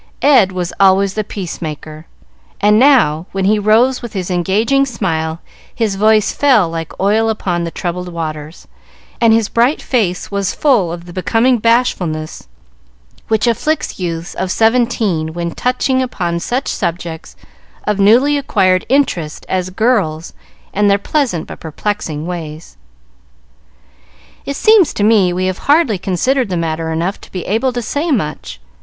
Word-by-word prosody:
Ed 255 -10 +5
was 180 -1 -4
always 195 0 +4
the 215 - -2
peace 195 -4 -7
maker, 155 0 -7 0.5
and 210 +1 +4
now, 215 - +4
when 195 -1 -1
he 210 +2 +3
rose 225 +5 +3
with 240 - -8
his 185 -1 -4
engaging 210 +10 +1
smile, 165 -10 -2 0.3
his 225 -4 0
voice 215 +1 +3
fell 255 -10 +3
like 165 -1 -6
oil 215 +3 +2
upon 180 -5 -2
the - - -3
troubled 180 +1 -4
waters, 155 -2 -6 0.5
and 230 -1 +5
his 225 -1 +3
bright 240 +6 +1
face 200 -9 -1
was 200 -1 -2
full 235 - +2
of 170 0 -7
the 175 - -11
becoming 230 +7 +1
bashfulness 180 - 0 0.8
which 220 +1 +1
afflicts 290 +5 -1
youths 170 -2 -4
of 185 - -3
seventeen 225 -8 +1
when 170 -1 -3
touching 255 +3 0
upon 175 -9 -2
such 250 +9 -2
subjects 170 -1 -4 0.5
of 210 -1 -1
newly 250 +9 +4
acquired 185 -8 +1
interest 185 - 0
as 185 -1 -2
girls 185 -7 0 0.4
and 205 +1 +2
their 200 - +4
pleasant 215 - -1
but - - -10
perplexing 160 -2 -4
ways. 160 - -7 1.7
"It 280 - -3
seems 425 -3 +4
to 205 - -1
me 205 -4 +4
we 185 +1 -1
have 185 0 -2
hardly 285 - +3
considered 235 +7 0
the 180 - -2
matter 160 0 -2
enough 170 +5 -2
to - - -15
be 180 -3 -5
able 225 +6 0
to 240 -1 -3
say 290 +9 -2
much. 150 - -3
195 Hz, 150 wpm, -16 LUFS, 170-235 Hz, 1.7 s, Ed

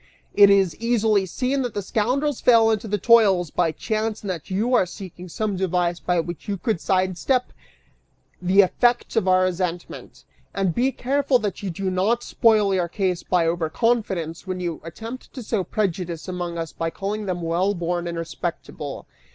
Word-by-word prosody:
It 200 -1 +7
is 195 -5 +3
easily 220 -4 +2
seen 260 +8 -1
that 245 -4 -3
the 205 - -2
scoundrels 255 +7 0
fell 225 -2 +5
into 220 0 -1
the 210 0 0
toils 195 -7 +4
by 170 -2 +1
chance 215 +5 -2
and 200 - -3
that 165 -5 -7
you 215 +7 0
are 190 -7 +4
seeking 180 -1 -9
some 210 +3 -2
device 180 -2 0
by 180 -1 0
which 175 0 -5
you 200 -1 -2
could 215 -3 -1
sidestep 190 +7 0 0.9
the 185 +3 +5
effects 240 +7 +1
of 220 -4 +1
our 185 0 +4
resentment. 180 -1 -4 0.3
And 195 -3 +1
be 255 +7 +1
careful 275 +1 +1
that 210 -4 -4
you 200 - -3
do 185 +2 -3
not 210 +6 +1
spoil 215 -4 +3
your 180 -2 +1
case 185 -1 -1
by 180 -2 +1
over 165 -1 0
confidence 190 -6 -1
when 185 -1 -3
you 175 -3 -4
attempt 225 - -9
to 255 - -6
sow 215 -3 -1
prejudice 175 -3 -3
among 175 -2 -4
us 165 -1 -4
by 165 - -2
calling 205 +4 -4
them 175 -2 -2
well 180 +5 +1
born 175 0 -2
and 170 -1 -4
respectable! 165 -3 -5
190 Hz, 180 wpm, -23 LUFS, 175-220 Hz, 0.9 s, It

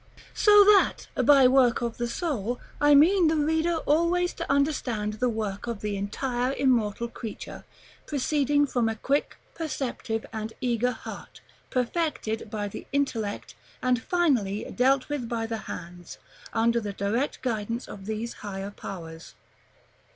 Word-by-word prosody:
So 415 -1 +7
that, 410 -1 +4 0.2
by 275 -3 +7
work 250 -2 +4
of 235 -1 -3
the 240 - -1
soul, 245 - -2 0.2
I 290 0 +6
mean 345 +4 +6
the 320 - +2
reader 320 +3 +1
always 340 +4 +2
to 335 - -4
understand 255 -7 0
the 245 +4 0
work 215 -2 -3
of 230 -3 -4
the 210 -1 -2
entire 245 +6 -2
immortal 235 -4 +1
creature, 230 -2 -8 0.4
proceeding 290 0 +2
from 245 -4 0
a 225 - -2
quick, 275 +6 -1 0.2
perceptive, 255 -8 -3
and 220 0 -4
eager 245 -1 +1
heart, - - -9 0.3
perfected 250 -5 -2
by 210 -1 -3
the 200 - -8
intellect, 235 -7 -2 0.3
and 250 -2 +1
finally 250 - +1
dealt 260 +1 +3
with 280 -6 -3
by 230 -1 -1
the 225 0 -3
hands, 175 0 -8 0.3
under 230 +1 +2
the 205 -2 -4
direct 225 +9 -2
guidance 230 -1 -2
of 195 -1 -10
these 220 +2 -3
higher 195 -1 -5
powers. 165 -5 -9
240 Hz, 145 wpm, -27 LUFS, 215-285 Hz, 0.4 s, So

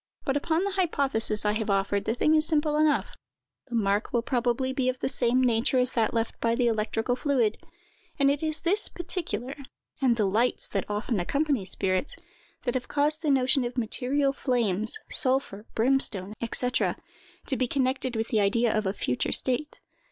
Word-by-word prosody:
But, 270 - 0
upon 320 +4 0
the 400 - -1
hypothesis 275 - +1
I 210 - +3
have 215 0 -2
offered, 200 +1 0
the 225 - 0
thing 305 +5 +2
is 310 0 +3
simple 300 -1 +1
enough: 305 0 +1 0.5
the 245 - -5
mark 205 -1 0
will 235 -1 0
probably 250 +1 0
be 260 -1 0
of 255 - -2
the - - -2
same 255 0 +2
nature 240 +1 +2
as 250 0 +2
that 225 -2 +1
left 225 -1 -3
by 230 0 +1
the 245 0 +1
electrical 225 +1 0
fluid;—and 275 +2 -2
it 285 - -2
is 310 -1 -1
this 395 +5 +1
particular, 340 -7 -4 0.5
and 255 -3 +3
the 215 - +2
lights 220 +6 +1
that 195 -1 -3
often 210 +1 -1
accompany 280 - 0
spirits, 185 +6 -1 0.5
that 245 - -1
have 255 -1 -3
caused 300 +2 +1
the 310 - -1
notion 265 -1 +3
of 240 +1 -5
material 270 +4 0
flames, 230 - +1
sulphur, 255 -6 +1
brimstone, 225 -5 +2 0.2
&c., 250 - +2 0.8
to 270 - +2
be 255 -1 0
connected 260 -1 -1
with 225 0 -2
the 220 - +1
idea 225 +3 +2
of 215 -2 0
a 190 - -1
future 125 -10 -2
state. 260 +4 0
250 Hz, 180 wpm, -27 LUFS, 220-280 Hz, 0.8 s, I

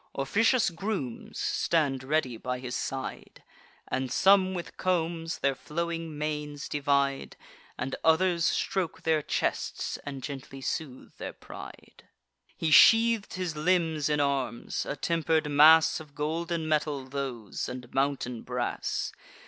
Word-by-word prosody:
Officious 215 - +2
grooms 170 - -4
stand 140 -6 0
ready 135 -3 0
by 125 +3 -3
his 125 -1 -5
side; 135 -1 -5 0.4
And 130 -1 -2
some 190 -1 +4
with 175 - -6
combs 165 -2 -1
their 140 - +1
flowing 165 +1 -4
manes 150 -1 -3
divide, 140 -1 0 0.4
And 135 - -3
others 170 +1 +3
stroke 180 0 -1
their 160 -1 +2
chests - - -2
and 135 -2 -8
gently 135 -1 -7
soothe 135 -1 -5
their - - -5
pride. - - -12 0.5
He 160 -2 0
sheath'd 225 +5 +6
his 180 -4 -3
limbs 160 -2 +1
in 150 -1 +1
arms; 140 -4 -1
a - - -2
temper'd 160 -1 +1
mass 155 +3 +7
Of 150 -2 -13
golden 160 +2 -2
metal 150 -3 0
those, 130 -6 -4
and 125 -1 -8
mountain 135 -3 -1
brass. - - -2
150 Hz, 125 wpm, -28 LUFS, 135-170 Hz, 0.5 s, mass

